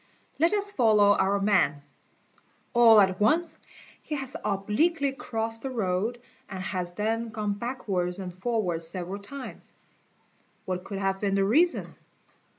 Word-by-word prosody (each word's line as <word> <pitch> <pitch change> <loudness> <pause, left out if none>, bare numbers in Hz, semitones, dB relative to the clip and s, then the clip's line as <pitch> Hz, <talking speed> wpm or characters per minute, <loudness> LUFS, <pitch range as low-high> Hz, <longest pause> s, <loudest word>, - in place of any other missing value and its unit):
Let 330 +2 +4
us 410 -1 0
follow 215 - +4
our 200 +1 +1
man. 190 -8 +2 0.9
All 230 -3 +7
at 190 -1 +2
once 315 +9 +2 0.4
he 305 - -5
has 270 -2 -1
obliquely 220 - 0
crossed 225 -3 -4
the 270 - -4
road 220 0 -1 0.3
and 190 -1 -6
has 180 -2 -3
then 225 +4 -2
gone 215 -2 -2
backwards 200 -6 -3
and 185 -2 -6
forwards 185 -5 0
several 185 +3 -4
times. 265 +5 -9 0.9
What 185 0 -4
could 200 - -5
have 195 0 -1
been 200 -1 0
the 195 0 +2
reason? 325 - +2
210 Hz, 140 wpm, -27 LUFS, 190-245 Hz, 0.9 s, All